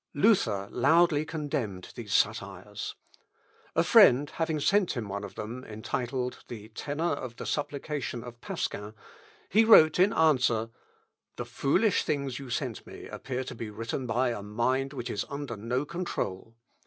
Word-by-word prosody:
Luther 120 - +3
loudly 155 +2 +4
condemned 135 - -4
these 115 -5 -8
satires. 100 -1 -1 0.8
A - - +4
friend 140 +4 +6
having 160 -2 -1
sent 195 +5 +3
him 120 -6 -4
one 100 +1 -4
of 100 - -8
them, 115 +4 -6
entitled, 125 +3 -3
"The 110 -3 -8
Tenor 145 +7 -4
of 130 -5 -4
the - - -7
Supplication 145 -4 -3
of 120 -1 -11
Pasquin," 105 +2 -4 0.5
he 220 +4 +5
wrote 170 -8 +7
in 190 +3 +5
answer, 125 -8 +3 0.6
"The - - -4
foolish 200 +9 +2
things 140 -4 -2
you 135 -2 -8
sent 125 -2 -3
me - - -10
appear 130 -1 -4
to 130 - -7
be 115 -2 -6
written 115 +4 -4
by 125 +3 +1
a 115 - -4
mind 125 +6 0
which 125 -4 -5
is 100 - -1
under 140 -4 -5
no 120 +6 -2
control. 115 - -4
125 Hz, 155 wpm, -29 LUFS, 110-145 Hz, 0.8 s, wrote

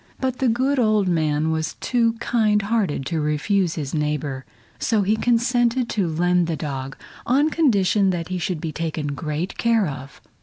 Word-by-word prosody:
But 260 -1 -2
the 265 - +2
good 260 +4 +1
old 215 -4 +2
man 155 -2 +1
was 160 -1 -2
too 230 -2 +1
kind 220 -2 +1
hearted 200 - -1
to 160 +2 -1
refuse 160 +4 0
his 145 -4 -4
neighbor, 150 -3 -2 0.3
so 220 -3 +1
he 210 +3 +2
consented 240 +1 +1
to 200 -5 0
lend 175 +2 +1
the 165 - -1
dog 135 -3 -5 0.3
on 285 +5 +3
condition 205 - +3
that 175 -2 -2
he 185 -1 -2
should 175 -1 -2
be 160 0 -4
taken 155 -2 -3
great 150 +4 -4
care 230 -3 +3
of. 140 -3 -7
185 Hz, 175 wpm, -22 LUFS, 155-230 Hz, 0.3 s, on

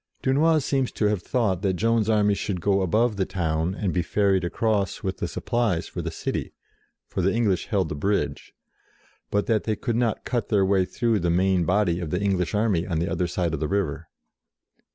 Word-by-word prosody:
Dunois 155 +5 +3
seems 135 -2 0
to 105 - 0
have 105 -4 -1
thought 100 -5 0
that 95 -2 +1
Joan's 115 +2 +1
army 105 -2 +3
should 100 -2 -3
go 100 +2 +2
above 110 +4 +1
the 95 - +1
town, 80 0 -1
and 100 -4 -2
be 90 - +1
ferried 95 0 +1
across 100 +1 -1
with - - -2
the - - -2
supplies 115 -8 -1
for - - -5
the - - -3
city - - -4 0.5
for - - -3
the 95 +2 +2
English 105 -5 0
held 100 -7 +1
the - - -3
bridge 100 +8 -1 0.8
but 100 0 0
that 110 -3 +1
they 110 - 0
could 120 0 -2
not 115 -2 0
cut 120 -4 -2
their 100 -3 +3
way 95 -1 +2
through 115 +1 0
the 85 -1 0
main 90 0 +2
body 90 -2 +2
of 85 -3 -4
the 90 - -1
English 95 -2 0
army 105 -5 +1
on 85 -4 -1
the 85 +3 0
other 90 - 0
side 85 -1 -1
of 80 - -2
the 75 - -1
river. 95 -6 -2
100 Hz, 210 wpm, -25 LUFS, 90-110 Hz, 0.8 s, Dunois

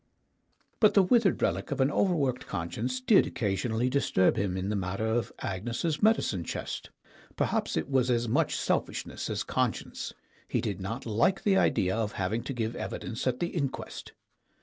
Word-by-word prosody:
But 215 - +5
the 200 - +7
withered 215 0 +3
relic - - 0
of 140 -2 -3
an 135 +2 +3
overworked 145 -10 +1
conscience 115 +10 -3
did 130 - +5
occasionally 110 +3 -1
disturb 130 -8 +2
him 95 -2 -1
in 95 +1 -2
the 105 - 0
matter 100 +2 -2
of 115 +1 0
Agnes's 120 - -2
medicine 210 - +3
chest. - - -5 0.5
Perhaps - - 0
it - - -1
was 130 -2 +2
as 120 -1 +1
much 110 - +1
selfishness - - -2
as - - -1
conscience; - - -2 0.4
he - - 0
did 100 -2 -3
not 115 +7 -4
like 115 - +2
the 200 -2 +4
idea 95 - +2
of 110 -2 -1
having 100 +5 -1
to 135 - -3
give 115 -2 -2
evidence 120 +2 -4
at 125 -1 0
the 175 - 0
inquest. 140 -7 -4
120 Hz, 170 wpm, -29 LUFS, 105-140 Hz, 0.5 s, the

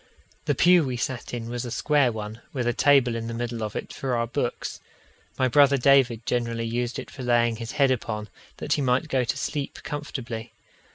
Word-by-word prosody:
The - - +1
pew 175 -1 +6
we 130 -3 -2
sat 125 +2 -3
in 115 -2 -4
was 120 0 -4
a 120 - -5
square 140 +1 +2
one, 110 +1 -6
with 125 -4 -2
a 120 - +1
table 135 -3 +4
in 115 0 -4
the 115 - -4
middle 120 -1 -3
of 105 -1 -4
it - - -5
for 130 -2 -2
our 115 0 +1
books. 115 - -3 0.6
My 130 - +3
brother 140 +2 +5
David 125 -4 +4
generally 115 -1 -1
used 120 +1 -2
it - - -7
for 135 - -9
laying 120 -2 +2
his 115 0 -6
head 140 -2 +3
upon, 110 -4 -2 0.3
that - - -1
he 145 - 0
might 130 +4 +1
go 130 -2 +2
to 120 - -2
sleep 145 -2 -3
comfortably. 130 -6 -5
120 Hz, 210 wpm, -25 LUFS, 115-135 Hz, 0.6 s, pew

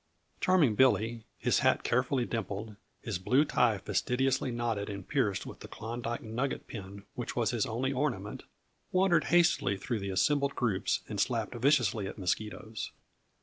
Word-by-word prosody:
Charming 175 -11 +4
Billy, 115 -1 +3
his - - +2
hat - - +3
carefully 125 +1 +1
dimpled, 105 -1 -4 0.3
his 105 -7 -3
blue 130 +10 +3
tie 120 -7 +3
fastidiously 125 +7 0
knotted 115 -4 -2
and 100 -2 -6
pierced 115 -9 0
with - - -9
the - - -9
Klondyke 120 +1 -5
nugget 120 +5 -2
pin 100 -2 -8
which 120 - -5
was 115 -2 +1
his 120 -4 0
only 130 +4 -1
ornament, 125 -8 -2 0.5
wandered 185 -3 +3
hastily 170 - +3
through 115 +2 -2
the 100 0 -4
assembled 140 +9 +2
groups 105 -6 0
and 105 -2 -4
slapped 115 +2 0
viciously 120 -5 +2
at - - -7
mosquitoes. 105 +3 -3
115 Hz, 150 wpm, -31 LUFS, 105-130 Hz, 0.5 s, Charming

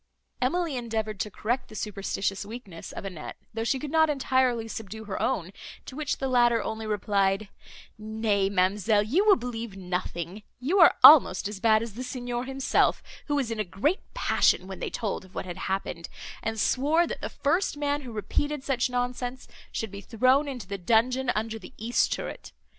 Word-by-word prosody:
Emily 315 +2 0
endeavoured 220 -3 -3
to 210 - -2
correct 235 +5 -2
the 215 - -11
superstitious 195 -1 -2
weakness 205 -6 -9
of - - -7
Annette, 180 -6 -7 0.2
though 225 +1 -2
she 250 +4 +1
could 285 +2 -6
not 320 -1 +4
entirely 260 -5 +1
subdue 220 0 -7
her 205 -3 -4
own; 195 -8 -1 0.3
to 260 - -9
which 300 -2 -2
the 270 - -2
latter 240 -2 +3
only 220 0 -4
replied, 200 -1 +1 0.5
"Nay, 215 -2 0
ma'amselle, 200 +2 +2
you 290 - +2
will 400 - +8
believe 230 -4 -5
nothing; 180 0 -4 0.2
you 315 +11 +1
are 335 - +8
almost 260 -11 +9
as 205 -1 -6
bad 220 +1 +4
as 230 -3 -7
the 250 +4 -6
Signor 245 -1 -4
himself, 270 0 +1 0.2
who 290 - 0
was 265 -5 0
in 225 - -3
a - - +2
great 210 - 0 0.2
passion - - +3
when 190 0 -8
they - - -3
told 210 -4 -3
of 185 0 -18
what - - -3
had 175 -2 -6
happened, 175 -3 -3 0.3
and 225 0 -3
swore 300 +10 +3
that - - -6
the - - -3
first 330 +2 0
man, 290 0 0
who 250 -4 -8
repeated 285 +6 -2
such 260 -2 0
nonsense, 250 +1 -3 0.2
should 220 -3 -4
be 200 0 -7
thrown 255 +7 +3
into 255 -5 -5
the 200 -1 -5
dungeon 240 +6 +2
under 225 +1 -2
the 180 - -12
east 230 +3 +1
turret. - - -5
225 Hz, 185 wpm, -27 LUFS, 200-260 Hz, 0.5 s, almost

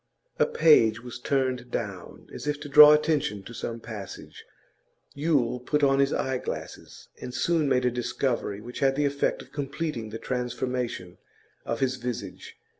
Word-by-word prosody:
A - - +4
page 120 - +4
was 125 -1 -8
turned 130 -2 -1
down, 100 -7 -6
as - - -7
if 150 0 -1
to 150 - -6
draw 150 +1 +9
attention 150 -10 +1
to 120 - -10
some 115 0 -5
passage. 105 -4 -9 0.7
Yule 140 -5 +1
put 150 +4 -1
on 135 -1 +4
his 140 0 +3
eyeglasses, 130 -1 -4
and 125 - -6
soon 155 +3 +1
made 125 -1 +2
a 125 - +2
discovery 120 -3 -2
which 120 +3 -8
had 135 -1 +2
the 145 +1 +1
effect 140 0 -1
of - - -21
completing 145 -4 -4
the 110 - -6
transformation 125 -6 -3 0.5
of 115 +2 -3
his 130 -1 +1
visage. 120 -6 -6
125 Hz, 160 wpm, -26 LUFS, 115-140 Hz, 0.7 s, draw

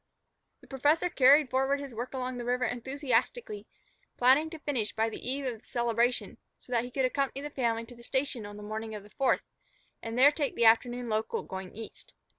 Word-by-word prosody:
The - - -18
professor 295 +6 +2
carried 280 -1 +5
forward 270 +2 +1
his 280 -3 -7
work 240 +4 -5
along 255 -1 -3
the - - -4
river 250 +1 0
enthusiastically, 280 - -2 0.5
planning 265 +6 +4
to 325 - -8
finish 265 -8 -2
by 225 +1 +1
the 230 - -6
eve 275 +1 -2
of 240 -4 -3
the - - -25
celebration, 235 0 0 0.2
so - - -18
that 235 -1 +2
he 245 - -6
could 265 +1 0
accompany 275 +1 -1
the 295 - -5
family 230 -3 0
to 245 - -13
the 235 - -15
station 260 -2 -1
on 205 0 -9
the 210 - -9
morning 220 +1 -5
of 205 - -8
the 205 - -17
Fourth, 270 - +1 0.6
and 225 +1 -5
there 275 +3 +7
take 290 -3 -2
the 235 - +2
afternoon 240 +2 +4
local 220 - -1
going 190 0 -7
east. 225 0 -11
250 Hz, 210 wpm, -30 LUFS, 230-275 Hz, 0.6 s, there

